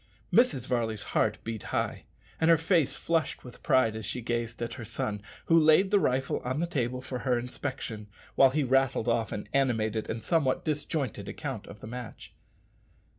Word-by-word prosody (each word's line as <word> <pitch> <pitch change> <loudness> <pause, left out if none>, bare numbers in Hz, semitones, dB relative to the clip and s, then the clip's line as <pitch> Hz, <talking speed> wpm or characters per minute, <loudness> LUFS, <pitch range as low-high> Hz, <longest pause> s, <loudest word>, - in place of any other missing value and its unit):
Mrs. 220 - +4
Varley's 115 -4 -1
heart - - +2
beat 115 -2 -4
high, - - -2 0.3
and 160 - +3
her 165 - +7
face 165 -2 +2
flushed 165 -3 -1
with 125 - -12
pride 130 -6 +3
as 110 - -5
she 105 - -3
gazed 120 -1 -2
at 115 - -4
her 125 - -7
son, 105 -2 -3 0.2
who 165 - +4
laid 165 +4 +5
the 205 - +5
rifle 130 -4 0
on 130 +3 -3
the 170 - +1
table 125 -6 -2
for 130 -1 -4
her 125 -2 +1
inspection, 120 -3 -5 0.3
while 135 - +6
he 150 +3 0
rattled 135 -2 +2
off 115 -3 +1
an 105 - -5
animated 115 -5 +1
and 110 -1 -4
somewhat 140 -1 +1
disjointed 150 -4 -2
account - - -5
of 105 - -11
the - - -8
match. 120 0 -8
125 Hz, 180 wpm, -29 LUFS, 115-150 Hz, 0.3 s, her